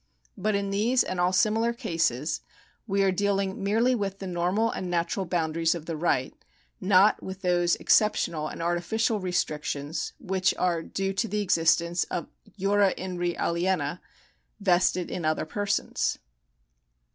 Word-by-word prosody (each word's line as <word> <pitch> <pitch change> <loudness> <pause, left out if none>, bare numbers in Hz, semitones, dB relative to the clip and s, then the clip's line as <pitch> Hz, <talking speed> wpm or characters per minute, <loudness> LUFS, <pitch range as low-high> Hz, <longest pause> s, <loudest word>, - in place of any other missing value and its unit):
But 215 -1 0
in 200 0 -1
these 230 +6 +2
and 185 - -4
all 180 +1 +3
similar 220 +5 +2
cases 160 - -1 0.5
we 195 -1 +2
are 195 - +3
dealing 195 0 -1
merely 225 +5 +2
with 200 -4 -2
the 195 - -7
normal 185 +5 0
and 185 - -4
natural 175 +2 -1
boundaries 165 -1 +1
of 165 -2 -7
the 165 - -4
right, 150 -5 0 0.5
not 195 +2 +4
with 190 0 -7
those 175 -1 +2
exceptional 170 -7 +2
and 165 - -6
artificial 205 +6 0
restrictions 150 -4 -2
which 190 -6 0
are 175 -2 +1
due 195 +3 -3
to 215 +4 -1
the 210 -1 -1
existence 170 -2 +2
of 175 - -4 0.3
jura 200 0 +3
in 185 -1 -5
re 175 -1 0
aliena 170 -2 0 0.6
vested 180 -2 +2
in 180 - -4
other 155 0 0
persons. 205 +4 -1
185 Hz, 145 wpm, -27 LUFS, 170-200 Hz, 0.6 s, not